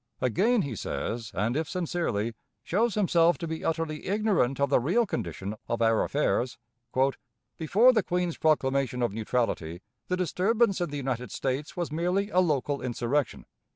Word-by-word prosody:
Again 195 - +2
he 135 -6 -4
says, 115 +3 -4
and, 105 +6 0
if 160 +1 -1
sincerely, 165 - -1 0.3
shows 215 - +1
himself 175 -4 +3
to 170 - -5
be 160 0 -5
utterly 160 -1 -2
ignorant 195 - +1
of 140 - +1
the - - +5
real 185 - +2
condition 100 - -4
of 115 - -1
our 115 -1 +3
affairs: 130 -3 0 1.0
"Before 215 +11 +5
the 220 - +3
Queen's 180 -2 -1
proclamation 135 -5 +1
of 120 - 0
neutrality, 105 -6 -2 0.2
the 180 - 0
disturbance 195 +3 +1
in 175 - 0
the 145 - -4
United 125 -3 -3
States 135 +5 -3
was 175 -3 -2
merely 180 +6 0
a 185 - +3
local 145 -5 +1
insurrection. 125 +2 -1
150 Hz, 155 wpm, -28 LUFS, 125-180 Hz, 1.0 s, the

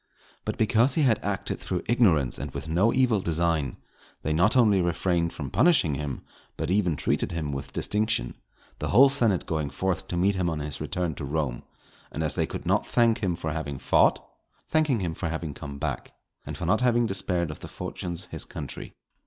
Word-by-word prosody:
But - - -3
because 115 +4 +3
he 155 - +3
had 115 -5 +2
acted 100 -2 -2
through - - -3
ignorance 85 - +3
and - - -4
with - - -5
no 90 +8 +3
evil 125 -6 +2
design, 85 -3 0 0.5
they 75 - 0
not 90 +10 +3
only 105 -6 +5
refrained 85 -1 0
from 70 -4 -6
punishing 145 - +4
him, 70 -1 -4 0.3
but - - -2
even 95 -5 +2
treated - - -1
him 80 -3 -2
with 70 0 -5
distinction; 105 - 0 0.5
the - - -2
whole 135 +3 +7
senate 115 -9 +1
going 80 -3 -2
forth 95 +5 -2
to 90 - -3
meet 95 +3 +3
him 90 -2 0
on 80 - -2
his 75 -1 -5
return 90 -3 -2
to 70 - -7
Rome, 70 -3 -2 0.5
and 80 - -3
as 75 -3 0
they - - 0
could - - -6
not - - +1
thank 115 -1 +3
him 95 -6 0
for 80 -1 -4
having 75 -3 -4
fought, - - +3 0.4
thanking 155 -8 +2
him 85 -3 -2
for 80 +1 -3
having 80 -2 -4
come 70 0 -8
back, 70 -3 -4 0.3
and - - -5
for - - -4
not 110 - +2
having 120 -1 +3
despaired 90 -5 -1
of 75 - -10
the - - -8
fortunes 90 0 -5
his - - -2
country. - - -7
85 Hz, 200 wpm, -26 LUFS, 75-110 Hz, 0.5 s, whole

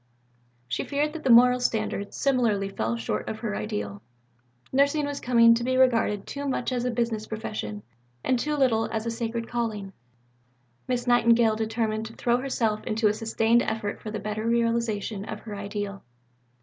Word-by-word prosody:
She 125 - -2
feared 295 +1 -1
that 325 - -7
the 265 - 0
moral 250 +1 +7
standard 215 -4 -1
similarly 235 -8 +1
fell 115 - -2
short 110 -2 -3
of 110 - -4
her 100 - -2
ideal; 100 -1 -4 0.7
nursing 280 +2 +3
was 285 0 -4
coming 230 -1 +5
to 235 +1 0
be 255 +1 +1
regarded 230 -6 +3
too 285 0 -5
much 260 -1 -1
as 245 -1 -1
a - - +1
business 230 -2 -1
profession, 160 - -5 0.4
and 255 - +1
too 300 +4 -1
little 240 -6 +2
as 220 0 -2
a 230 - -1
sacred 230 0 -3
calling. 215 -5 -3 0.9
Miss 250 -1 -1
Nightingale 235 -2 +4
determined 220 0 -1
to 225 - -11
throw 240 +1 +1
herself 235 -5 -1
into 220 -1 +2
a - - +1
sustained 225 +1 +2
effort 220 -3 -3
for 215 - -6
the 215 - -4
better 215 +1 -3
realization 230 -3 0
of 215 0 -7
her 215 -2 -7
ideal. 200 0 -5
225 Hz, 175 wpm, -26 LUFS, 210-245 Hz, 0.9 s, moral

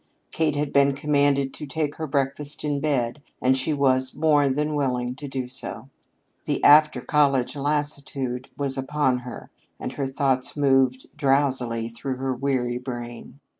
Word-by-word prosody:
Kate 155 -2 0
had 145 0 -2
been 140 0 +4
commanded 140 -1 +1
to 150 - -6
take 150 0 -3
her 160 - -4
breakfast 140 +1 -1
in 145 -2 -1
bed 140 -2 -1 0.2
and 130 +1 +3
she 130 +4 +2
was 130 -3 +1
more 145 -3 +3
than 150 +3 -1
willing 125 -4 -1
to 140 +3 -8
do 130 -2 -4
so. 130 0 -2 0.6
The - - -2
after 155 +1 +6
college 140 -3 +1
lassitude 140 -3 -2
was 135 -1 -1
upon 135 -2 0
her 125 -1 -10 0.3
and - - -5
her 140 -2 -2
thoughts 135 0 0
moved 135 -2 +2
drowsily 135 -5 +1
through 120 +3 -5
her 130 0 -2
weary 125 -2 -1
brain. 120 +1 -8
135 Hz, 155 wpm, -24 LUFS, 130-145 Hz, 0.6 s, after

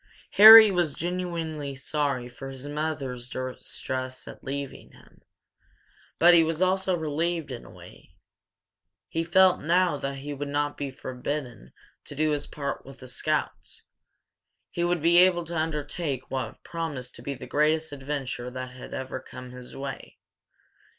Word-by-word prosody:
Harry 220 0 +11
was 175 -5 0
genuinely 165 -5 -3
sorry 140 -2 -2
for 130 +2 -9
his 135 +1 -7
mother's 145 -5 -4
distress 130 0 -5
at - - -11
leaving 140 0 -6
him, - - -20 1.0
but 175 +1 +7
he 170 -1 +7
was 160 0 -2
also 185 0 +1
relieved, 160 0 -2
in 120 - -6
a - - -13
way. 85 -1 -15 0.9
He 165 - -1
felt 185 +2 +4
now 175 -1 +2
he 140 +1 -5
would 145 +1 -5
not 145 +1 -1
be 140 -1 -4
forbidden 130 -2 -6 0.3
to - - -9
do 155 +1 +1
his 145 -1 -2
part 140 -2 -4
with 135 0 -12
the 130 - -12
scouts. 150 +4 -3 0.9
He 170 - -2
would 175 -2 0
be 170 +1 +6
able 180 -1 +5
to 170 +1 -6
undertake 150 -3 -3
what 130 -1 -4
promised 150 -7 -5
to - - -11
be 140 - -4
the - - -9
greatest 155 +1 +1
adventure 135 -3 -4
that 130 0 -6
had 130 0 -9
ever 130 0 -5
come 125 -1 -11
his 125 0 -11
way. 135 0 -7
145 Hz, 150 wpm, -27 LUFS, 130-165 Hz, 1.0 s, Harry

